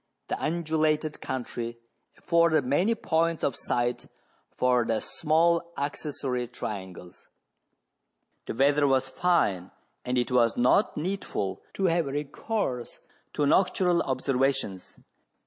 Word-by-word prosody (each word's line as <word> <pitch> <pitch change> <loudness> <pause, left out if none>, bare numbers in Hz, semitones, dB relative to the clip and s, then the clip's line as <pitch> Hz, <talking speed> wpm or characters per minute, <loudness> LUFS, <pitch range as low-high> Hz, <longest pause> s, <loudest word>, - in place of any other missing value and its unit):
The - - -2
undulated 155 -1 0
country 120 -2 -4 0.4
afforded 170 -4 +3
many 175 - +2
points 165 -4 0
of 135 - +1
sight 120 0 -1 0.4
for 125 -1 +2
the 115 -1 0
small 170 +2 +1
accessory 140 -3 -3
trian 100 -6 -6
gles. 90 0 -14 1.2
The - - -4
weather 140 +3 +3
was 130 -1 +2
fine, 130 - +1 0.3
and 125 0 -1
it 120 +1 0
was 120 -2 +3
not 125 - +3
needful 150 - -3
to 195 - 0
have 170 -3 +2
recourse 140 - -3 0.4
to 145 - +1
nocturnal 180 +2 +3
observations. 130 -7 -1
140 Hz, 115 wpm, -27 LUFS, 125-165 Hz, 1.2 s, afforded